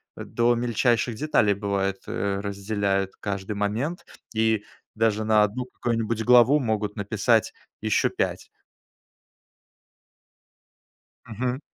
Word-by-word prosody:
до 120 Hz, +1 st, +1 dB
мельчайших 120 Hz, 0 st, +1 dB
деталей, 110 Hz, -6 st, +2 dB
бывает, 100 Hz, -1 st, -1 dB
э, 100 Hz, -1 st, -2 dB
разделяют 100 Hz, -1 st, -1 dB
каждый 100 Hz, 0 st, -4 dB
момент, 110 Hz, -, -2 dB, 0.3 s
и 110 Hz, -1 st, +1 dB, 0.3 s
даже 110 Hz, -1 st, +1 dB
на 110 Hz, -1 st, +4 dB
1 120 Hz, +5 st, -2 dB
какую-нибудь 115 Hz, -2 st, -2 dB
главу 125 Hz, +4 st, +6 dB
могут 110 Hz, -3 st, -2 dB
написать 110 Hz, +2 st, +1 dB, 0.3 s
еще -, -, +2 dB
5. -, -, -2 dB, 2.8 s
Мгм. 125 Hz, +4 st, -2 dB
110 Hz, 95 wpm, -25 LUFS, 100-120 Hz, 2.8 s, главу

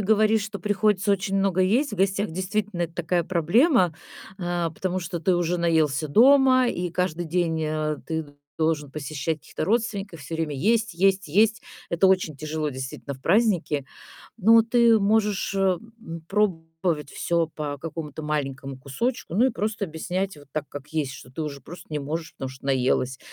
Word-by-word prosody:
говоришь, 215 Hz, +1 st, +3 dB
что 205 Hz, -1 st, -5 dB
приходится 205 Hz, +1 st, +2 dB
очень 195 Hz, 0 st, -1 dB
много 195 Hz, -2 st, +2 dB
есть 230 Hz, +10 st, +2 dB
в -, -, -4 dB
гостях, 195 Hz, +1 st, +1 dB
действительно, 190 Hz, +1 st, -2 dB
это 165 Hz, 0 st, -4 dB
такая 175 Hz, 0 st, 0 dB
проблема, 185 Hz, -, +3 dB, 0.4 s
э, 175 Hz, -2 st, -1 dB
потому 185 Hz, 0 st, -2 dB
что 170 Hz, -1 st, -4 dB
ты 180 Hz, +3 st, +2 dB
уже 175 Hz, 0 st, 0 dB
наелся 155 Hz, -3 st, +1 dB
дома, 255 Hz, -, +6 dB
и 180 Hz, -5 st, -2 dB
каждый 175 Hz, -1 st, -1 dB
день, 165 Hz, -1 st, 0 dB
э, 155 Hz, -1 st, -1 dB
ты 160 Hz, -1 st, -2 dB, 0.3 s
должен 155 Hz, -3 st, 0 dB
посещать 155 Hz, +2 st, -3 dB
каких-то 150 Hz, -, -5 dB
родственников. 200 Hz, -4 st, -1 dB
Всё 145 Hz, +3 st, -6 dB
время 160 Hz, -2 st, -2 dB
есть, 220 Hz, -, +1 dB
есть, 195 Hz, +2 st, +2 dB
есть. 215 Hz, +6 st, +3 dB, 0.3 s
Это 170 Hz, +3 st, +3 dB
очень 185 Hz, -6 st, +2 dB
тяжело, 155 Hz, +1 st, -3 dB
действительно, 130 Hz, +1 st, -6 dB
в 130 Hz, -, -16 dB
праздники. 175 Hz, -, +2 dB, 0.5 s
Но 225 Hz, +2 st, +6 dB
ты 235 Hz, 0 st, +4 dB
можешь, 205 Hz, -1 st, +1 dB
э, -, -, -1 dB, 0.4 s
м, 165 Hz, -5 st, -8 dB
пробовать 165 Hz, -6 st, -1 dB
всё 170 Hz, -1 st, 0 dB
по 145 Hz, -2 st, -4 dB
какому-то 155 Hz, 0 st, -6 dB
маленькому 135 Hz, -3 st, -3 dB
кусочку. 160 Hz, -, -3 dB
Ну 235 Hz, +7 st, +4 dB
и -, -, +2 dB
просто 215 Hz, -1 st, -2 dB
объяснять 180 Hz, +2 st, -3 dB
вот 145 Hz, -1 st, -16 dB
так, 155 Hz, -1 st, -3 dB
как 145 Hz, 0 st, -9 dB
есть, 150 Hz, -4 st, -2 dB
что 125 Hz, -, -11 dB
ты 145 Hz, +5 st, -5 dB
уже 145 Hz, -2 st, -5 dB
просто 175 Hz, +6 st, -11 dB
не 150 Hz, -, -1 dB
можешь, 160 Hz, +3 st, -4 dB
потому 135 Hz, -, -5 dB
что 130 Hz, +1 st, -11 dB
наелась. 130 Hz, -1 st, +1 dB
175 Hz, 170 wpm, -25 LUFS, 155-200 Hz, 0.5 s, дома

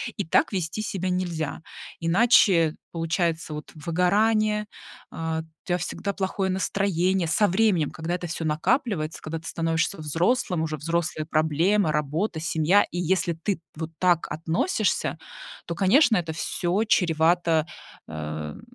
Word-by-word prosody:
и 200 Hz, -, -3 dB
так 165 Hz, -, +2 dB
вести 180 Hz, +3 st, -2 dB
себя 185 Hz, -3 st, -3 dB
нельзя, 175 Hz, -5 st, -2 dB, 0.4 s
иначе 170 Hz, -3 st, +4 dB, 0.2 s
получается 165 Hz, -1 st, -1 dB
вот 150 Hz, -, -8 dB
выгорание, 210 Hz, +7 st, +1 dB, 0.5 s
а, 160 Hz, 0 st, -3 dB
у -, -, -10 dB, 0.2 s
тя 175 Hz, -, 0 dB
всегда 200 Hz, +4 st, -3 dB
плохое 190 Hz, 0 st, -1 dB
настроение. 190 Hz, -1 st, 0 dB
Со 205 Hz, +7 st, +3 dB
временем, 185 Hz, -5 st, +2 dB
когда 165 Hz, +2 st, -3 dB
это 180 Hz, -, -5 dB
всё 165 Hz, -1 st, -4 dB
накапливается, 160 Hz, -, 0 dB
когда 160 Hz, +1 st, -5 dB
ты 160 Hz, -, -10 dB
становишься 165 Hz, +3 st, -1 dB
взрослым, 170 Hz, -, 0 dB
уже 155 Hz, -1 st, -3 dB
взрослая 155 Hz, 0 st, -2 dB
проблема, 160 Hz, +4 st, +2 dB
работа, 155 Hz, +5 st, -1 dB
семья. 165 Hz, +5 st, +3 dB
И -, -, -6 dB
если 175 Hz, 0 st, +1 dB
ты 165 Hz, +3 st, -3 dB, 0.2 s
вот 160 Hz, +1 st, -5 dB
так 175 Hz, -2 st, +2 dB
относишься, 165 Hz, -, 0 dB, 0.5 s
то, 170 Hz, -, -4 dB
конечно, 220 Hz, -, +4 dB
это 165 Hz, -3 st, -1 dB
всё 175 Hz, +4 st, -1 dB
чревато, 165 Hz, -4 st, +2 dB, 0.4 s
э, -, -, -11 dB
н 75 Hz, -1 st, -5 dB
170 Hz, 140 wpm, -25 LUFS, 160-190 Hz, 0.5 s, иначе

